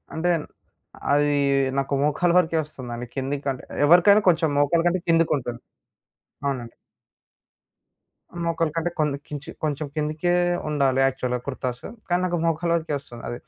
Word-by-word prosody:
అంటే 175 +2 +1 0.8
అది 145 0 +3 0.4
నాకు 135 +1 -1
మోకాల 150 +4 +2
వరకే 165 -2 +2
వస్తుందండి. 125 -5 -7
కిందకి 140 +1 -3
అంటే 130 - -7 0.2
ఎవరికైనా 180 +6 +6
కొంచెం 160 -2 +2
మోకాలు 165 +4 +2
కంటే 175 +1 +1
కిందకుంటుంది. 145 -8 +1 0.8
అవునండి. 125 -4 -3 1.7
మోకాల 165 -1 0
కంటే 165 +1 0
కొంది 150 -2 0
కొంచి 150 0 -6
కొంచం 150 0 -1
కిందికే 155 +3 0 0.3
ఉండాలి 135 -3 +2
యాక్చువల్‌గా 125 -2 -2
కుర్తాసు. 130 -2 -4 0.2
కానీ 175 0 +2
నాకు 175 -1 0
మోకలి 165 +1 +1
వరికే 160 -2 -3
వస్తుంది 120 -3 -12
అది. 120 - -5
150 Hz, 130 wpm, -24 LUFS, 135-165 Hz, 1.7 s, ఎవరికైనా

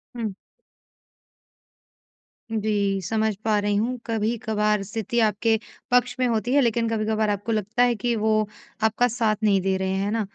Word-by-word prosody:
हुँ। 225 -4 -3 2.2
जी, 205 -3 0
समझ 220 +3 0
पा 215 -1 +3
रही 205 0 0
हूँ, 235 +5 0
कभी-कभार 215 -2 0
स्थिति 225 +4 -2
आपके 220 +1 +2 0.3
पक्ष 245 0 +3
में 255 - +3
होती 235 +1 0
है 285 - +5
लेकिन 235 -2 +1
कभी-कभार 220 -1 0
आपको 205 +2 -2
लगता 220 +2 +1
है 245 -1 +3
कि 235 +3 -1
वो 215 -1 +1 0.4
आपका 220 +3 +3
साथ 225 -2 +1
नहीं 200 -2 +3
दे 190 +1 +1
रहे, 190 0 -1
हैं 200 +2 -1
ना? 225 0 0
220 Hz, 155 wpm, -24 LUFS, 210-230 Hz, 2.2 s, है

